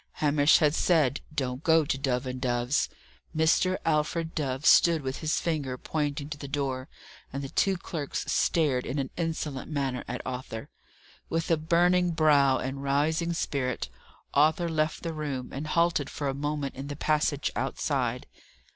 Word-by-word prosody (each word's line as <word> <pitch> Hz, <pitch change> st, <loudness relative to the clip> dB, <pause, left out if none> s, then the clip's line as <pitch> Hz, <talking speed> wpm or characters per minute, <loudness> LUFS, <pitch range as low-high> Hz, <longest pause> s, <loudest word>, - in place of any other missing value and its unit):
Hamish 145 Hz, 0 st, +4 dB
had 150 Hz, -1 st, +3 dB
said, 155 Hz, -6 st, +2 dB
"Don't 130 Hz, -1 st, -3 dB
go 160 Hz, -1 st, +4 dB
to 140 Hz, -, 0 dB
Dove 135 Hz, -1 st, -1 dB
and 130 Hz, 0 st, -5 dB
Dove's." 125 Hz, +3 st, +1 dB, 0.5 s
Mr. 175 Hz, +4 st, +3 dB
Alfred 160 Hz, +1 st, 0 dB
Dove 140 Hz, -2 st, -2 dB
stood 165 Hz, -3 st, +6 dB
with 130 Hz, 0 st, -3 dB
his 155 Hz, 0 st, 0 dB
finger 145 Hz, -6 st, -2 dB
pointing 145 Hz, 0 st, -2 dB
to 150 Hz, -, -5 dB
the 140 Hz, -, -6 dB
door, 135 Hz, -2 st, -2 dB, 0.4 s
and 140 Hz, +1 st, -4 dB
the 135 Hz, -, -5 dB
two 195 Hz, +5 st, +1 dB
clerks 160 Hz, -5 st, -4 dB
stared 145 Hz, -7 st, +1 dB
in 140 Hz, -, -3 dB
an 135 Hz, -2 st, -2 dB
insolent 160 Hz, -5 st, -3 dB
manner 135 Hz, -4 st, -2 dB
at 125 Hz, +1 st, -4 dB
Arthur. 125 Hz, -3 st, -5 dB, 0.6 s
With 165 Hz, +1 st, -1 dB
a -, -, +6 dB
burning 175 Hz, +2 st, +3 dB
brow 145 Hz, -4 st, +4 dB
and 135 Hz, +1 st, -4 dB
rising 155 Hz, +5 st, +1 dB
spirit, 130 Hz, -, -2 dB, 0.4 s
Arthur 155 Hz, +4 st, +3 dB
left 155 Hz, -1 st, -1 dB
the 165 Hz, -1 st, -3 dB
room, 145 Hz, -5 st, -4 dB
and 145 Hz, +3 st, -4 dB
halted 170 Hz, -3 st, +1 dB
for 145 Hz, -, -4 dB
a 135 Hz, -, 0 dB
moment 145 Hz, 0 st, -2 dB
in 135 Hz, +2 st, -7 dB
the 145 Hz, -, -5 dB
passage 150 Hz, -1 st, 0 dB
outside. 125 Hz, -1 st, -1 dB
145 Hz, 165 wpm, -28 LUFS, 135-160 Hz, 0.6 s, stood